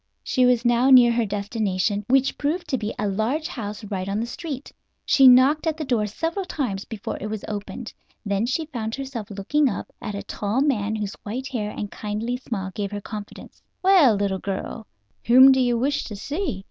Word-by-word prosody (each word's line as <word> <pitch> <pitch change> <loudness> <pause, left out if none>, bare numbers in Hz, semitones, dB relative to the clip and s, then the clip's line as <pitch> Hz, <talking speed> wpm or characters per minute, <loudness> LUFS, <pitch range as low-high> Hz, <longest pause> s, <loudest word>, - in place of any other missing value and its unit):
She 255 -2 +2
was 245 -1 +2
now 240 +2 +4
near 250 -3 +8
her 235 -2 +1
destination, 205 0 -1
which 270 +1 +3
proved 310 +5 -2
to 265 - +1
be 215 0 -3
a 210 - -1
large 225 +11 -1
house 210 -2 -6
right 195 -2 -4
on 200 +2 -1
the 230 - -1
street. 280 +2 -6 0.3
She 270 -2 +6
knocked 265 +6 +6
at 315 -1 0
the 310 - -4
door 235 -5 +1
several 330 - -3
times 245 - -3
before 220 -4 -6
it 210 - -3
was 215 -1 -5
opened. 210 +3 -6 0.3
Then 200 +2 0
she 290 +6 -1
found 235 -7 -4
herself 265 -6 -6
looking 255 +9 +1
up 200 - -5
at 210 -2 -5
a 200 - -5
tall 205 +4 -2
man 220 -7 +1
whose 210 -2 -3
white 255 +6 -5
hair 220 -6 -3
and 205 -1 -6
kindly 220 +4 -3
smile 200 -7 -5
gave 200 0 -3
her 205 - -4
confidence. 210 0 -9 0.2
"Well, 360 - +6
little 200 -1 -1
girl, 200 +3 -5 0.4
whom 260 +3 +9
do 265 - +3
you 245 -1 +2
wish 275 +4 0
to 210 - -7
see?" 285 - -3
230 Hz, 200 wpm, -23 LUFS, 205-265 Hz, 0.4 s, whom